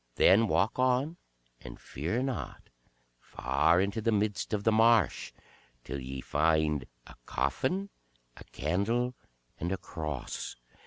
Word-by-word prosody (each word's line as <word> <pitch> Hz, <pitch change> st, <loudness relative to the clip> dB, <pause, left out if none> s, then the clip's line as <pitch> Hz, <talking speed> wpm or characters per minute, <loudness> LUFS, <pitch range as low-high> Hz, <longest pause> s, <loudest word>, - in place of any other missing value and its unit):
Then 110 Hz, +4 st, +5 dB
walk 105 Hz, +5 st, +1 dB
on 130 Hz, +6 st, +2 dB, 0.4 s
and -, -, -10 dB
fear 90 Hz, -, -3 dB
not, 135 Hz, -2 st, -5 dB, 0.5 s
far 70 Hz, +10 st, +1 dB
into 100 Hz, +3 st, 0 dB
the 115 Hz, -, +1 dB
midst 105 Hz, -1 st, 0 dB
of 105 Hz, -2 st, -1 dB
the 110 Hz, -, +4 dB
marsh, 110 Hz, -, +3 dB, 0.5 s
till 70 Hz, -, -5 dB
ye 65 Hz, 0 st, -6 dB
find 75 Hz, -2 st, +1 dB, 0.2 s
a -, -, -13 dB
coffin, 130 Hz, -, -1 dB, 0.4 s
a -, -, -12 dB
candle, 110 Hz, -, -1 dB, 0.5 s
and 85 Hz, +3 st, -2 dB
a 95 Hz, -, 0 dB
cross. 75 Hz, -7 st, -5 dB
100 Hz, 125 wpm, -30 LUFS, 75-115 Hz, 0.5 s, Then